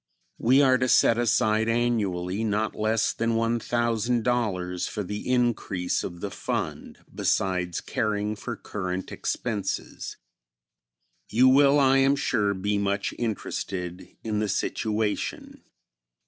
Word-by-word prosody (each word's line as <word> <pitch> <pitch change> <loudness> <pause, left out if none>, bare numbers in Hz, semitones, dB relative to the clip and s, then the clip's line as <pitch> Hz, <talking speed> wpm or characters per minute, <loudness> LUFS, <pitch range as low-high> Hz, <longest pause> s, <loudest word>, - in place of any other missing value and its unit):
We 130 +5 +5
are 130 -1 +4
to 130 - +1
set 115 -1 +4
aside 110 -1 +2
annually 105 -5 0
not 110 0 0
less 110 +1 +1
than 115 0 0
$1,000 115 -4 0
for 105 - -4
the 105 +5 -5
increase 115 -7 0
of 85 -1 -6
the - - -4
fund, - - -4
besides 90 -2 0
caring 105 0 -1
for 120 +3 -5
current 95 -3 -5
expenses. 105 -5 -3 1.1
You 125 +4 +5
will, 140 +2 +5
I 135 -1 +5
am 135 +1 +4
sure, 105 -7 0
be 100 +2 -1
much 100 0 -1
interested 95 -5 -4 0.2
in 110 -2 -1
the 105 -1 -1
situation. 105 +1 -2
110 Hz, 120 wpm, -26 LUFS, 100-120 Hz, 1.1 s, We